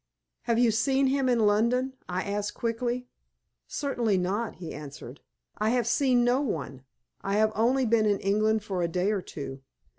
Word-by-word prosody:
"Have 235 -2 +1
you 240 -1 +4
seen 265 +5 +2
him 265 0 +2
in 235 -3 +3
London?" 235 +5 +2 0.2
I 180 +1 -1
asked, 205 0 -3
quickly. 240 +2 -2 0.6
"Certainly 240 -8 0
not," 200 +5 -1
he 170 -3 -7
answered; 145 -2 -9 0.4
"I 215 +1 +2
have 245 0 +1
seen 245 0 +3
no 245 +3 +3
one. 140 - -4 0.4
I 195 +1 -1
have 215 +1 +3
only 250 +4 +2
been 220 -1 +3
in 205 -1 +2
England 215 +2 +1
for 190 -4 -3
a 170 - +1
day 180 +4 0
or 205 -3 -1
two. 135 -5 -7
220 Hz, 175 wpm, -27 LUFS, 195-245 Hz, 0.6 s, you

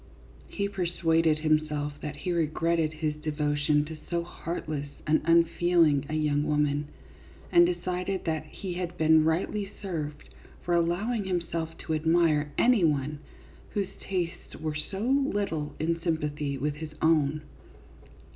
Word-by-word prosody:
He 200 -1 -2
persuaded 165 -4 +1
himself 155 -1 0
that 150 -1 -5
he 180 +5 -3
re 165 -2 +2
gretted 165 0 +1
his 155 -1 -2
devotion 150 -1 +1
to 160 +1 -7
so 170 -1 0
heartless 155 -4 -5 0.2
and 155 +1 +3
unfeeling 165 -3 +4
a 155 - -2
young 150 -1 +1
woman, 150 -1 +1 0.6
and 175 0 +7
decided 180 +2 -2
that 160 -2 -1
he 185 +3 -6
had 175 0 -4
been 160 0 +5
rightly 195 +5 0
served 155 -7 -5 0.4
for 175 - 0
allowing 190 +6 +1
himself 170 -3 -2
to 160 - -1
admire 155 -2 +2
any 240 -6 +4
one 150 -1 +1 0.6
whose 200 -2 0
tastes 180 -3 -4
were 155 0 -2
so 150 +6 -5
little 205 - 0
in 165 +1 0
sympathy 150 -4 -1
with 145 +2 -2
his 160 0 -6
own. 155 -2 +3
160 Hz, 135 wpm, -28 LUFS, 150-175 Hz, 0.6 s, and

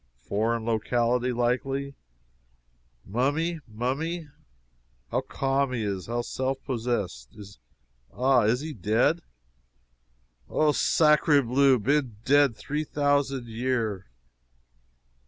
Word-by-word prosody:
Foreign 110 +2 -1
locality, 120 +2 +1
likely. 135 +3 -1 1.1
Mummy 145 - 0
mummy. 145 +9 -3 0.8
How - - +1
calm 135 0 -1
he 115 -3 -2
is 100 -3 -3
how 120 +1 -2
self 130 +2 -2
possessed. 110 - -3
Is, 100 - -12 0.5
ah 130 0 +3
is 120 +5 +2
he 155 0 -5
dead?" 120 - +1 1.3
"Oh, 155 -1 +3
sacre 150 -1 +4
bleu, 130 +2 +4
been 130 0 0
dead 140 -3 +4
three 150 +2 -3
thousan' 145 -3 0
year!" 115 -4 -2
125 Hz, 100 wpm, -26 LUFS, 115-140 Hz, 1.3 s, sacre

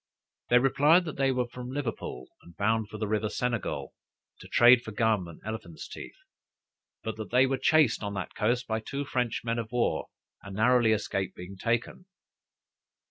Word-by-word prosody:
They 120 - +6
replied, 145 +7 +4
that 155 - -6
they 135 -1 +2
were 125 -1 0
from 125 +1 -8
Liverpool, 125 - -4 0.2
and 85 - -17
bound 110 +1 +1
for 110 - -7
the 110 0 -2
river 110 0 0
Senegal, 120 -2 -2 0.5
to - - -12
trade 120 0 +6
for 110 - -8
gum 110 -5 +1
and 85 - -11
elephants 110 -7 -6
teeth; - - -9 0.9
but 110 0 -4
that 110 - -6
they 125 +2 +5
were 135 -1 -1
chased 150 -2 +4
on 100 -1 -4
that 95 - -5
coast 120 +3 0
by 110 -2 -1
two 140 +5 -4
French 125 -3 -1
men 115 0 -1
of 110 -1 -5
war, 125 -1 0 0.3
and 100 0 -9
narrowly 120 +1 +4
escaped 100 -3 -1
being 90 +2 -9
taken. 115 - -2
115 Hz, 180 wpm, -28 LUFS, 105-125 Hz, 0.9 s, They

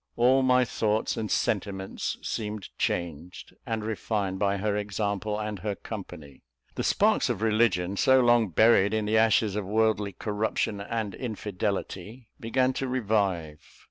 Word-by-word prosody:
All 130 +3 +4
my 125 -1 +4
thoughts 110 -1 0
and 110 -2 -3
sentiments 95 0 -2
seemed 105 -2 -4
changed 85 0 -3
and 110 -1 -2
refined 100 -2 -2
by 100 -1 +1
her 105 +1 -1
example 105 0 -2
and 105 -2 -4
her 105 +1 -3
company. 70 -5 -9 0.3
The - - -3
sparks - - +2
of 105 - -2
religion, 110 -4 +2
so 130 +4 +5
long 120 -3 +4
buried 105 +2 +4
in 110 -1 0
the 110 +1 +3
ashes 110 -2 +3
of 105 - -1
worldly 105 0 +1
corruption 105 -1 -2
and 110 -1 -3
infidelity, 105 0 -4
began 130 +3 +1
to 135 - -3
revive. 100 -11 -1
105 Hz, 140 wpm, -27 LUFS, 100-110 Hz, 0.3 s, so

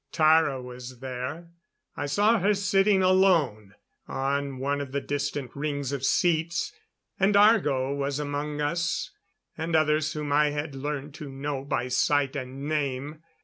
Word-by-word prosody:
Tara 155 -4 +4
was 125 0 -9
there; 130 +6 -5 0.5
I 145 - -3
saw 210 +9 +3
her 205 +3 +2
sitting 195 0 +3
alone 165 - +3 0.3
on 140 0 -2
one 140 +2 -1
of 135 -2 -7
the 140 - +1
distant 145 -2 -3
rings 140 -2 -2
of 140 -2 -3
seats. 170 - +1 0.5
And 195 +2 +3
Argo 150 - +4
was 140 0 -2
among 145 0 -3
us 170 +3 -1 0.4
and 160 +1 -2
others 155 0 +2
whom 150 -2 -4
I 150 +1 +4
had 145 0 -4
learned 145 +1 -4
to 150 -2 -8
know 135 0 -4
by 125 -3 -2
sight 140 +2 +2
and 135 +1 -5
name. 150 0 -2
145 Hz, 145 wpm, -27 LUFS, 135-160 Hz, 0.5 s, Tara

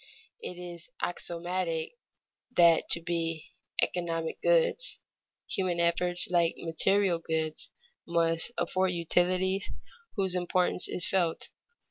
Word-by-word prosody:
_ - - -19 0.4
It 180 - -7
is 175 -2 -9
axiomatic 175 -1 -2 0.7
that 170 -2 +5
to 170 - +4
be 165 -2 -3 0.3
"economic 165 -2 -2
goods" - - +2 0.5
human 180 -2 -1
efforts 175 +1 +4
like 170 -1 +2
material 180 +2 +1
goods 160 -1 -3 0.4
must 165 +3 +1
afford 185 -1 0
utilities 180 +3 +1 0.5
whose 190 -4 0
importance 180 0 +1
is 175 - +1
felt. 175 -4 0
175 Hz, 105 wpm, -29 LUFS, 165-185 Hz, 0.7 s, that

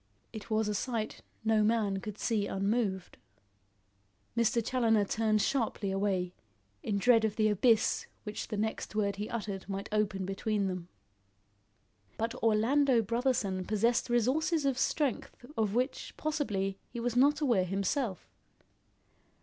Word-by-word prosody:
It 220 -1 -8
was 215 -1 +1
a 210 - 0
sight 220 0 -3 0.2
no 220 -1 +4
man 210 -2 +2
could 210 +1 -7
see 215 -4 0
unmoved. 195 -2 -1 1.2
Mr. 235 -1 +2
Challoner 225 -5 +2
turned 215 0 +1
sharply 225 -6 0
away, 190 -2 0 0.5
in 205 - -1
dread 230 +2 +5
of 215 -1 0
the 215 -1 +3
abyss 215 +2 +3 0.2
which 210 0 -5
the 210 - -4
next 220 0 -3
word 200 -2 0
he 210 +1 -4
uttered 205 -4 -4
might 195 0 -4
open 205 -3 0
between 200 +2 -1
them. 180 -2 -4 1.3
But 230 +1 -1
Orlando 230 +3 +3
Brotherson 225 -5 0
possessed 230 +3 +1
resources 280 +7 +1
of 270 -2 +2
strength 275 -4 -1
of 215 -2 0
which, 255 +3 -2
possibly, 205 -11 -1
he 235 - -6
was 240 0 -1
not 285 +4 +4
aware 240 -11 +2
himself. 195 - -2
215 Hz, 135 wpm, -31 LUFS, 200-240 Hz, 1.3 s, dread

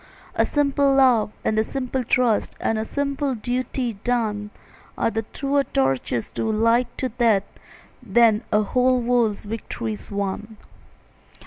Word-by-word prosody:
A - - +2
simple 280 -1 +2
love 250 -6 +4
and 215 - +2
a - - +3
simple 260 +1 -3
trust 235 -2 +1
And 225 - 0
a 220 - -2
simple 280 0 -1
duty 245 -1 -2
done, 215 -4 -1 0.5
Are - - +1
truer 275 +6 -1
torches 135 - -1
to 220 - -1
light 230 +3 +3
to 260 - -1
death 230 -4 +2 0.6
Than 230 -1 +4
a 210 0 +3
whole 255 +3 +2
world's 235 -3 +1
victories 220 0 -5
won. 200 +2 -4
230 Hz, 130 wpm, -23 LUFS, 215-255 Hz, 0.6 s, love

